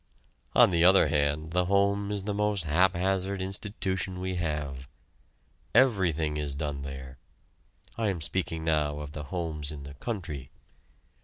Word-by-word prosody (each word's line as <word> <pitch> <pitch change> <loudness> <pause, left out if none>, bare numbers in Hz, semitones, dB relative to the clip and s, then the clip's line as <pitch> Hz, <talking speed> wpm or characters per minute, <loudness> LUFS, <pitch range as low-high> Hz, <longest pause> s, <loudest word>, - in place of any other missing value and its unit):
On - - +7
the 85 -1 +3
other 95 -3 +6
hand 75 +1 0
the 90 +1 +2
home 100 +1 +2
is 100 -2 -2
the 105 +1 -2
most 105 -2 0
haphazard 95 +4 +1
institution 95 -1 -3
we 95 0 -2
have. 75 -6 -3 0.9
Everything 85 - +3
is 75 -2 -2
done 70 -1 -3
there. 65 -1 -8 0.8
(I 110 - +1
am 95 -4 -1
speaking 80 -1 0
now 75 -2 +1
of 75 -1 -7
the 75 -1 -6
homes 80 -4 -1
in 75 -2 -8
the 70 0 -9
country.) 75 - -5
85 Hz, 145 wpm, -28 LUFS, 75-95 Hz, 0.9 s, On